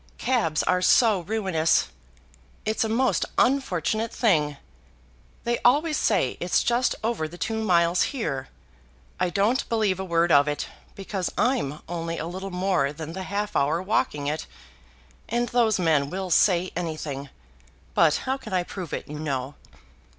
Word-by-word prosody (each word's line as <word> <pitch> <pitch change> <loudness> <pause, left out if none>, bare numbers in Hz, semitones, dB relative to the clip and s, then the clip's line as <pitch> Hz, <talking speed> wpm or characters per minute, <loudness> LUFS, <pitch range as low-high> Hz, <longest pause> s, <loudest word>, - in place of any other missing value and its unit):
Cabs 225 -12 +1
are 180 0 +2
so 215 +2 +5
ruinous. 180 - +1 0.8
It's 215 +1 +1
a 220 - -1
most 250 +3 +2
unfortunate 225 - +1
thing; 150 - +1 0.9
they 235 0 0
always 300 +6 +3
say 195 - +1
it's 175 0 +1
just 240 +1 +1
over 225 -9 -1
the 170 +3 -11
two 220 +3 -2
miles 170 -3 +3
here. 145 - -3 0.7
I 180 - +1
don't 210 +8 +1
believe 215 -5 +1
a - - -2
word 170 -1 +1
of 140 0 +6
it, 145 0 -2 0.3
because 195 -2 -3
I'm 195 - 0
only 165 0 -4
a 155 - -3
little 190 +3 -5
more 180 -6 0
than 160 +1 -7
the 190 - -5
half 205 +1 -2
hour 150 +4 +2
walking 180 -7 -1
it; 150 +2 -2 0.8
and 240 +1 0
those 230 -3 +3
men 155 -6 +2
will 185 +2 -4
say 180 +1 +3
anything. 155 -5 -4 0.6
But 160 -3 +4
how 265 +1 0
can 225 -7 -9
I 180 -1 +2
prove 175 -3 -7
it, - - -4
you 150 +1 -7
know?" 140 -3 -3
180 Hz, 155 wpm, -25 LUFS, 160-220 Hz, 0.9 s, of